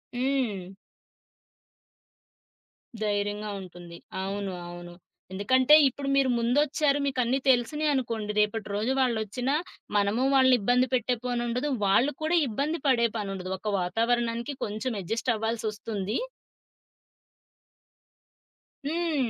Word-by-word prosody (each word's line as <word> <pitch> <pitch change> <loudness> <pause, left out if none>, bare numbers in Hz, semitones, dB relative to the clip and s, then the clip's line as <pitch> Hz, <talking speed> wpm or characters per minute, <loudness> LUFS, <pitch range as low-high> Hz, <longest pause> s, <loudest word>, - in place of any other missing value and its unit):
హ్మ్. 245 -8 -1 2.3
ధైర్యంగా 205 0 -1
ఉంటుంది. 175 -2 -11 0.3
అవును. 195 0 -3 0.2
అవును. 175 0 -9 0.4
ఎందుకంటే 255 +9 +5
ఇప్పుడు 275 +2 -4
మీరు 275 -1 +3
ముందొచ్చారు 285 +4 +2
మీకన్నీ 260 -1 +1
తెలుసినయి 280 +5 +2
అనుకోండి 230 -5 -2
రేపటి 210 +1 0
రోజు 220 +6 0
వాళ్ళొచ్చినా 245 +2 0 0.4
మనము 205 +5 +1
వాళ్ళని 260 -1 +6
ఇబ్బంది 250 +4 +3
పెట్టే 250 0 +1
పనుండదు. 245 +2 -1 0.2
వాళ్ళు 240 +9 +3
కూడా 340 +2 +2
ఇబ్బంది 285 +9 -2
పడే 235 -3 +4
పనుండదు. 195 -3 -4
ఒక 210 +2 -3
వాతావరణానికి 235 +6 0
కొంచెం 220 +4 -3
అడ్‌జస్టవ్వాల్సొస్తుంది. 220 0 -2 2.7
హ్మ్. 315 -6 0
235 Hz, 95 wpm, -27 LUFS, 205-260 Hz, 2.7 s, వాళ్ళని